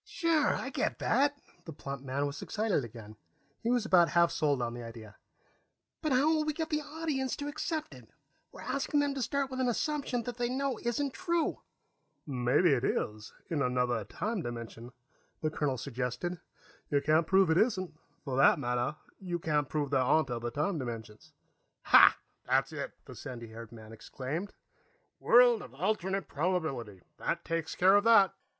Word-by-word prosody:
"Sure. 325 -4 +1
I - - -4
get - - -1
that." 285 +1 +1 0.3
The 165 - -7
plump 140 -1 -6
man 140 +1 -2
was 140 0 -5
excited 210 -9 0
again; 110 -2 -10 0.4
he 230 - -1
was 245 -2 +2
about 175 -5 +5
half 170 -1 +4
sold 145 -3 +1
on 120 -1 -2
the 120 - -7
idea. 115 -3 -10 0.9
"But 310 - -1
how 265 +3 +4
will 315 -1 +3
we 305 0 -1
get 320 +1 -4
the 300 0 +1
audience 295 -4 -3
to 285 - -5
accept 310 +1 -3
it? - - -14 0.4
We're - - -11
asking 280 +1 0
them 285 -1 +1
to 275 - -4
start 275 +2 -1
with 260 - -4
an 255 - +1
assumption 255 -1 -1
they 240 0 -3
know 265 -2 -1
isn't 260 +3 -1
true." 340 -3 -1 0.6
"Maybe 140 +4 +2
it 125 -2 0
is, 110 -3 -2 0.2
in 155 -4 -1
another 125 -3 0
time 210 - -3
dimension," 120 -2 -7 0.5
the 155 - 0
colonel 145 -4 -1
suggested. 135 +8 -3 0.5
"You 145 - +3
can't 155 +3 +2
prove 190 -2 +4
it 160 - +3
isn't. 190 -7 +1 0.3
For 135 -3 -3
that 135 - +6
matter, 125 +1 -1 0.2
you 180 -3 -3
can't 150 -4 0
prove 145 -3 -2
there 135 -2 +3
aren't 135 +1 +2
other 120 0 -2
time 150 +7 -1
dimensions." 115 -4 -7 0.5
"Hah, - - +8 0.3
that's - - +1
it!" - - -5
the - - -10
sandy 120 -3 -8
haired 115 0 -10
man 110 -1 -12
exclaimed. 140 - -5 0.7
"World 240 -1 +6
of 125 - -11
alternate 190 +3 -1
probability. 140 - -2
That - - -2
takes 165 -1 -2
care 190 +2 +5
of 205 - +2
that." 215 -4 +6
165 Hz, 175 wpm, -31 LUFS, -, 0.9 s, Hah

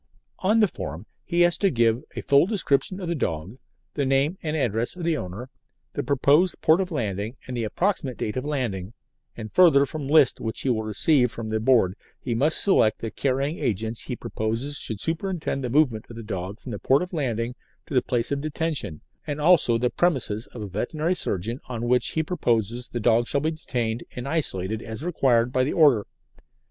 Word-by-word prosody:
On 215 +4 +3
the 210 - +5
form 80 - -7 0.2
he 175 0 0
has 175 0 +4
to 200 - +3
give 115 -4 +2
a - - -3
full 140 +5 +4
description 185 -3 0
of 180 - -5
the 170 - 0
dog, 95 - -3 0.3
the 145 - -1
name 135 +5 +2
and 155 -1 -2
address 115 - 0
of 180 - -7
the 165 -1 +1
owner, 110 +2 -6 0.4
the - - -2
proposed 145 +6 +2
port 160 +4 +4
of 185 - -3
landing, 110 - -3
and 130 - -6
the 115 -2 -1
approximate 145 - -1
date 105 - -3
of 130 - -2
landing, 115 -10 -3 0.4
and 110 -2 -7
further 155 -6 +6
from 145 0 -6
lists 145 -3 +5
which 110 -1 -2
he 135 - -1
will 115 -3 +1
receive 125 +4 +2
from 115 -1 -6
the 110 0 0
Board 110 -6 +3 0.2
he 120 - -3
must 145 +7 +3
select 115 - +3
the 115 - -5
carrying 140 +3 -1
agents 110 +1 -2
he 125 - -4
proposes 115 +7 -3
should 110 -3 -3
superintend 165 - -2
the 125 - -2
movement 125 -5 +2
of 115 - -10
the 115 - -7
dog 95 0 -5
from 130 - -8
the 105 - -5
port 135 +5 +3
of 180 - -8
landing 120 -6 -1 0.3
to - - -9
the 125 - +4
place 120 0 -1
of 140 0 -1
detention, 155 - -3 0.3
and 145 0 -3
also 150 -7 +4
the 125 +1 0
premises 130 -11 0
of 115 - -8
a - - -5
veterinary 150 - -1
surgeon 115 - -2
on 120 -1 -3
which 125 +1 +2
he 160 - +1
proposes 120 - -1
the 120 - -4
dog 120 +1 +3
shall 140 - +1
be 155 +2 0
detained 120 -7 -3
and 125 +2 -5
isolated 110 - -1
as 110 +5 -7
required 125 -8 +2
by 130 - +3
the 135 - -1
Order. 140 - +4
125 Hz, 205 wpm, -25 LUFS, 110-155 Hz, 0.4 s, further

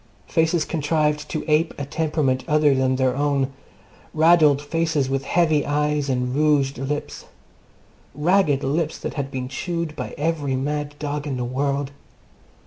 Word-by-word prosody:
Faces 160 0 +1
contrived 150 -1 0
to 155 - -3
ape 155 +2 +2
a 140 - -4
temperament 145 -3 0
other 150 -2 +4
than 130 -1 +1
their 130 -1 +1
own. 140 -1 0 0.6
Raddled 155 -3 +5
faces 150 -2 -1
with 135 0 -1
heavy 155 -4 +2
eyes 150 -1 0
and 125 -1 -1
rouged 145 -3 +2
lips. 145 +2 -4 0.9
Ragged 150 -2 +2
lips 150 +3 -1
that - - -5
had 140 -3 -3
been 130 -2 -4
chewed 170 +3 -4
by - - -6
every 145 -3 -1
mad 145 +2 -3
dog 145 0 -4
in 135 -3 -2
the 125 - -2
world. 140 +2 -1
145 Hz, 145 wpm, -22 LUFS, 135-155 Hz, 0.9 s, Raddled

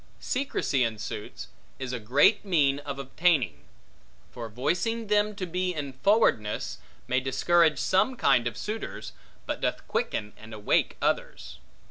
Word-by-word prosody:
Secrecy 250 - 0
in 115 -2 -1
suits, 105 0 -6 0.3
is 130 -2 -5
a 125 - -2
great 140 - +4
mean 145 -8 +2
of 140 -1 -6
obtaining; 135 - +1 0.7
for 115 -2 -7
voicing 180 - -1
them 210 0 +2
to 190 - -3
be 180 +1 -2
in 140 -3 -4
forwardness, 130 - +1 0.3
may 130 - +2
discourage 155 +4 +3
some 190 - +2
kind 130 - +3
of 115 -1 -4
suitors, 215 - -5 0.3
but - - -4
doth - - -2
quicken 105 0 -2
and 110 0 -10
awake 105 -1 +1
others. - - -2
140 Hz, 140 wpm, -27 LUFS, 120-185 Hz, 0.7 s, great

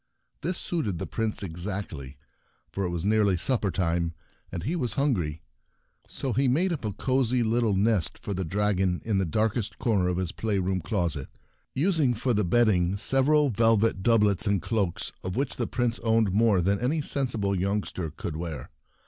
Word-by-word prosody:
This 175 +2 -1
suited 145 - 0
the 95 - -4
Prince 110 0 -2
exactly, 85 -6 -5 0.5
for 100 - -2
it - - -1
was 85 0 -3
nearly 105 -3 +3
supper 110 +2 0
time, 85 -2 -1 0.4
and 85 - -4
he 155 - -1
was 125 - -1
hungry. 90 - 0 0.6
So 130 -3 -3
he 135 +4 +2
made 170 +8 +2
up 155 - -5
a 105 - -1
cosy 130 +1 +1
little 115 -2 +1
nest 105 -2 +1
for 100 - -5
the 95 0 -2
dragon 95 0 0
in 105 -3 +1
the 95 - +1
darkest 110 +3 -1
corner 100 -6 +1
of 90 -1 0
his 90 -2 -2
playroom 95 -3 -1
closet, 80 -5 -2 0.5
using 150 -5 +2
for 120 +3 0
the 105 -1 +2
bedding 95 -2 +2
several 135 +5 +3
velvet 115 -2 +2
doublets 105 -4 +3
and 100 -1 +2
cloaks— 100 -4 -2
of 90 - -3
whichthe 135 0 -2
Prince 120 -2 -1
owned 110 -4 +2
more 105 -4 +3
than 100 +2 +1
any 145 +6 0
sensible 120 -9 -1
youngster 95 -3 -2
could 75 +1 -6
wear. 80 -2 -6
105 Hz, 170 wpm, -27 LUFS, 90-120 Hz, 0.6 s, nearly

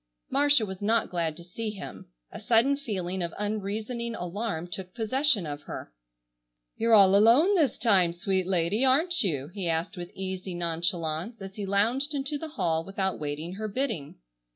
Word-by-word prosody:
Marcia 285 -4 +4
was 190 -1 -8
not 225 +2 +1
glad 165 -3 -1
to 170 - -9
see 215 +6 -5
him. 200 -3 -8 0.2
A - - -8
sudden 240 +4 +3
feeling 190 -9 -3
of 170 -1 -3
unreasoning 215 +3 -3
alarm 180 -1 -3
took 185 +1 -7
possession 245 - +1
of 145 -1 -5
her. - - -8 0.8
"You're 230 0 +4
all 195 -2 +7
alone 240 - +6
this 310 - +2
time, 195 -7 +3
sweet 185 +1 -1
lady, 185 +5 +1
aren't 315 +7 +4
you?" 150 - -1
he 180 -1 -3
asked 165 +5 -2
with 175 0 -6
easy 190 -1 -4
nonchalance, 170 +3 -2
as 195 0 -8
he 205 -2 -4
lounged 240 +10 +1
into 285 +1 -2
the 320 - -5
hall 165 - 0
without 190 +1 -2
waiting 150 +4 -4
her 215 +3 -4
bidding. 215 - -3
195 Hz, 170 wpm, -27 LUFS, 175-230 Hz, 0.8 s, all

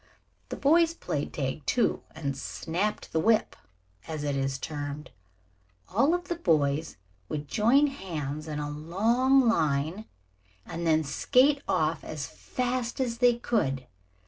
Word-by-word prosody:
The - - -4
boys 330 +3 +4
played 145 - -3
tag, 135 +1 -3
too, 245 - +2
and 140 -3 -3
"snapped 175 +9 -3
the 160 - +2
whip," 220 +6 +2 0.5
as 155 -2 -4
it 145 -1 -1
is 135 0 -1
termed. 145 0 -5 0.8
All 305 +5 +4
of 355 0 -5
the 345 - -2
boys 155 - +1 0.3
would 150 -1 -4
join 240 - +4
hands 155 - -4
in 150 -1 -4
a 150 0 -3
long 230 - +2
line 160 +1 +1 0.6
and 170 0 -4
then 160 0 +4
skate 275 - +3
off - - +1
as - - -5
fast 250 -1 -3
as 235 -3 -1
they 245 -1 +5
could. 135 - 0
170 Hz, 140 wpm, -28 LUFS, 150-250 Hz, 0.8 s, they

